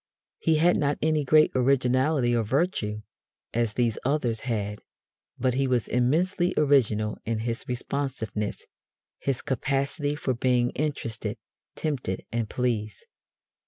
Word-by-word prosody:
He 160 - +2
had 170 +3 +4
not 145 -1 +1
any 155 -1 +2
great 155 +3 +5
originality 130 0 +2
of 115 -3 +1
virtue, 115 - 0 0.5
as 115 -2 0
these 115 -2 0
others 125 -5 0
had, 105 -4 -3 0.6
but 130 0 +1
he 135 +1 +1
was 125 -3 +1
immensely 175 +9 +1
original 115 -8 +2
in 115 0 -1
his 115 -1 -2
responsiveness 125 -5 -3 0.5
his 135 -3 -2
capacity 140 +2 -1
for 135 -3 -1
being 125 0 +2
interested, 115 -7 -3 0.4
tempted 135 - -3
and 115 -2 -1
pleased. 115 -4 -2
125 Hz, 125 wpm, -26 LUFS, 115-145 Hz, 0.6 s, great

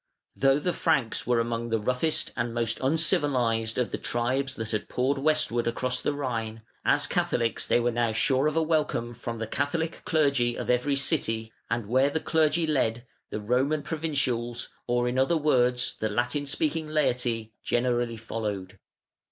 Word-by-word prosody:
Though 135 0 +4
the 175 +4 -1
Franks 130 -4 0
were 120 -1 +3
among 115 0 -2
the 115 - +2
roughest 125 +8 0
and 120 -1 -2
most 115 -1 0
uncivilised 130 -6 +2
of 125 -2 0
the - - -3
tribes 130 +3 -1
that 110 -1 -4
had 110 -2 -2
poured 135 +3 0
westwards 145 -5 +1
across 125 +2 0
the 145 - -1
Rhine, 115 -5 -3 0.2
as - - +3
Catholics 115 -1 0
they - - +3
were 120 0 +1
now 120 -1 +1
sure 130 +5 +2
of 155 - -1
a 165 - +3
welcome 150 -7 0
from 120 0 -6
the 115 - -3
Catholic 145 +7 -2
clergy 140 -7 +2
of - - -1
every 125 +3 +1
city, 115 -6 -1 0.2
and 115 -1 -1
where 130 +6 +3
the 160 - -1
clergy 160 +1 +2
led, 120 -6 0 0.2
the - - -4
"Roman" 130 +8 +1
provincials, 135 -7 -2 0.2
or 120 0 +1
in 125 +1 0
other 150 +6 +3
words 125 -5 +2
the 110 - 0
Latin 120 +6 -1
speaking 155 +2 -1
laity, 120 -7 0
generally 120 -1 0
followed. 105 -4 -5
125 Hz, 170 wpm, -27 LUFS, 115-145 Hz, 0.2 s, Though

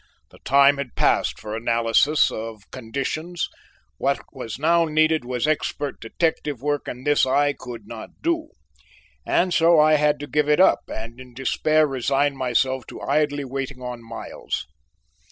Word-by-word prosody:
The - - -18
time 140 +1 +4
had 140 -3 -6
passed - - +1
for 105 0 -6
analyses 115 +6 +2
of 110 -2 -7
conditions; 140 +8 -3 0.5
what 140 0 +1
was 125 -5 -6
now 165 +3 +3
needed 155 -1 +2
was 125 +2 -2
expert 145 -2 -2
detective 150 +2 -1
work, 145 +2 -2
and 125 +1 -7
this 145 0 +3
I 145 +2 +3
could 120 -5 -9
not 110 0 -8
do, 330 -1 0 0.8
and 180 0 +2
so 165 -1 +5
I 155 0 +5
had 150 0 +2
to - - -4
give 150 0 +1
it 150 - +4
up 190 - +5
and 115 +2 -7
in 125 -2 -13
despair 155 +4 +2
resign 140 +1 0
myself 130 0 0
to - - -9
idly 145 0 0
waiting 135 0 -5
on 125 -1 -6
Miles. 115 0 -6
140 Hz, 155 wpm, -23 LUFS, 125-150 Hz, 0.8 s, so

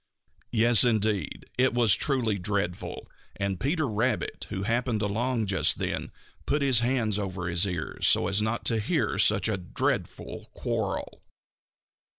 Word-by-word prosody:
Yes, 115 +1 +5
indeed 110 -4 0
it 130 -1 +3
was 115 -5 +5
truly 115 -2 +1
dreadful, 95 -2 -3 0.3
and 100 -2 -2
Peter 155 +3 0
Rabbit, 110 +1 -1
who 95 - -4
happened 115 0 0
along 115 +3 0
just 95 -6 +2
then, - - -3 0.4
put 145 0 +1
his 130 -4 +4
hands 120 -4 0
over 95 -3 -4
his 90 +2 +1
ears 90 -4 -2
so - - +4
as 100 +1 0
not 110 +2 -2
to 115 -2 +2
hear 110 - 0
such 110 +1 +4
a 110 -3 0
dreadful 90 -2 -3
quarrel. - - -3
110 Hz, 145 wpm, -27 LUFS, 100-120 Hz, 0.4 s, Yes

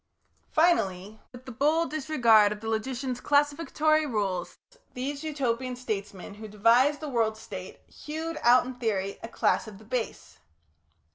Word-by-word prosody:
Finally, 215 - +1
with 250 +1 -13
a - - -6
bold 305 +7 +1
disregard 240 -9 +4
of 210 - -4
the 225 - -7
logician's 250 +3 -2
classificatory 300 +2 +2
rules, 195 -7 -2 0.4
these 280 +4 -4
Utopian 255 -5 -2
statesmen 205 -6 -5
who 215 +1 -9
devised 235 +8 +3
the 305 - -4
World 225 -5 0
State, 220 - -9
hewed 320 +2 -6
out 245 +1 +5
in 255 - -5
theory 205 -5 -2
a - - -6
class 230 - 0
of 210 -2 -10
the 215 - -16
Base. 235 - -4
245 Hz, 145 wpm, -27 LUFS, 215-290 Hz, 0.4 s, out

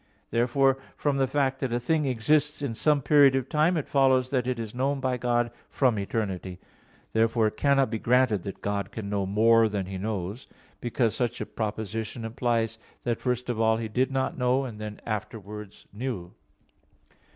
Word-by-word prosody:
Therefore 135 +3 +3 0.2
from 145 -2 0
the 135 -1 +2
fact 135 -1 0
that 130 -3 -2
a 120 - +1
thing 150 +5 +1
exists 145 +5 +1
in 130 -5 -1
some 145 +4 +2
period 140 -2 +6
of 135 -1 -1
time, 155 +5 +2
it 150 - -2
follows 130 -2 +3
that 125 -3 0
it 130 -1 0
is 115 -2 -5
known 135 +3 0
by 130 -1 0
God 120 -1 0 0.2
from 125 -6 +2
eternity. 95 -3 -3 0.6
Therefore 115 0 +3
it 110 0 -1
cannot 135 -4 +3
be 110 - -2
granted 125 -4 +3
that 100 +2 -8
God 100 -1 -2
can 105 -3 -6
know 100 -2 0
more 110 +2 +4
than 100 -2 -2
He 95 0 -6
knows; 105 +2 -4 0.3
because 120 -2 0
such 120 -2 -1
a - - -3
proposition 110 +1 -4
implies 115 -1 -1 0.2
that 120 -1 -1
first 125 -1 -1
of 120 -2 -1
all 110 0 +3
He 115 -1 -4
did 125 +5 +1
not 135 0 -1
know, 125 +2 +2
and 110 -4 -7
then 105 -1 -6
afterwards 105 -1 -6
knew. 105 -6 -4
120 Hz, 185 wpm, -27 LUFS, 110-130 Hz, 0.6 s, period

